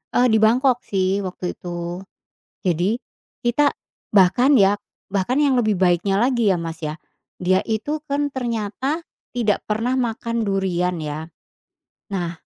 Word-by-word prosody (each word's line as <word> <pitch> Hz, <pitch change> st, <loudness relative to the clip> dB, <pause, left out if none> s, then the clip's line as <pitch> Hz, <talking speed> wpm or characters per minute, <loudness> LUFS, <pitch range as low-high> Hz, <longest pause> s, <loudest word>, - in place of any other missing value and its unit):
Eee, 250 Hz, +1 st, +5 dB
di 220 Hz, -, +4 dB
Bangkok 245 Hz, +3 st, +4 dB
sih 190 Hz, 0 st, +1 dB
waktu 185 Hz, -2 st, -4 dB
itu, 175 Hz, 0 st, -5 dB, 0.6 s
jadi, 185 Hz, +6 st, 0 dB, 0.4 s
kita 270 Hz, +5 st, +2 dB, 0.4 s
bahkan 220 Hz, +8 st, +5 dB
ya 195 Hz, +1 st, +5 dB, 0.3 s
bahkan 200 Hz, +8 st, 0 dB
yang 280 Hz, -3 st, +3 dB
lebih 215 Hz, -5 st, +2 dB
baiknya 185 Hz, +2 st, +3 dB
lagi 235 Hz, -4 st, +3 dB
ya 175 Hz, -, -1 dB
Mas 165 Hz, -1 st, -5 dB
ya, 150 Hz, +1 st, -4 dB, 0.4 s
dia 185 Hz, +1 st, +2 dB
itu 225 Hz, +7 st, -1 dB
kan 290 Hz, 0 st, 0 dB
ternyata 250 Hz, +3 st, -2 dB, 0.3 s
tidak 225 Hz, -5 st, 0 dB
pernah 230 Hz, +4 st, 0 dB
makan 230 Hz, -2 st, -1 dB
durian 180 Hz, -3 st, 0 dB
ya, 155 Hz, +1 st, -5 dB, 0.8 s
nah 175 Hz, -4 st, -3 dB
205 Hz, 135 wpm, -22 LUFS, 180-245 Hz, 0.8 s, Eee